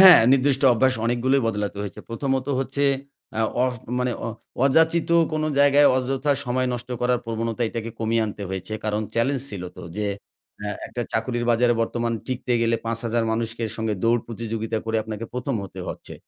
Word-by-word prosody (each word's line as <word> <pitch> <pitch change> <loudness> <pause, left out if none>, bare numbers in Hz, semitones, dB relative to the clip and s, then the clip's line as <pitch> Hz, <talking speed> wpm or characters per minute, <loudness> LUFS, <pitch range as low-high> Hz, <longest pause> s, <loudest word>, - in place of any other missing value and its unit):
হ্যাঁ, 190 -2 +11
নির্দিষ্ট 135 0 +3
অভ্যাস 130 +2 +3
অনেকগুলোই 125 +3 +2
বদলাতে 105 -2 -2
হয়েছে। 100 -4 -6
প্রথমত 130 +2 -1
হচ্ছে 135 +2 0 0.5
অ্যা 110 0 +1 0.2
অড 130 0 +2 0.3
মানে 125 0 0
অ - - -2 0.4
অযাচিত 160 +4 +3 0.2
কোনো 155 0 0
জায়গায় 145 0 +6
অযথা 135 +3 +1
সময় 130 +1 +1
নষ্ট 120 0 -6
করার 125 0 +2
প্রবণতা 115 +1 -2
এটাকে 115 0 -4
কমিয়ে 115 0 +1
আনতে 105 -1 -6
হয়েছে। 95 +2 -5
কারণ 105 0 0
চেলেঞ্জ 130 +4 +1
ছিল 100 -3 -5
তো - - -9
যে 105 0 0 0.5
অ্যা 105 0 -3 0.2
একটা 120 - -4
চাকরির 120 +1 -1
বাজারে 120 +1 +4
বর্তমান 115 0 -1
টিকতে 125 -1 -2
গেলে 115 0 +2
৫,০০০ 115 0 0
মানুষকে 115 +1 -2
সঙ্গে 110 -1 -1
দৌড় 115 +1 +3
প্রতিযোগিতা 115 -1 -3
করে 115 0 0
আপনাকে 110 0 -5
১ম 125 +2 -2
হতে 95 -1 -8
হচ্ছে। - - -7
120 Hz, 170 wpm, -24 LUFS, 110-130 Hz, 0.5 s, হ্যাঁ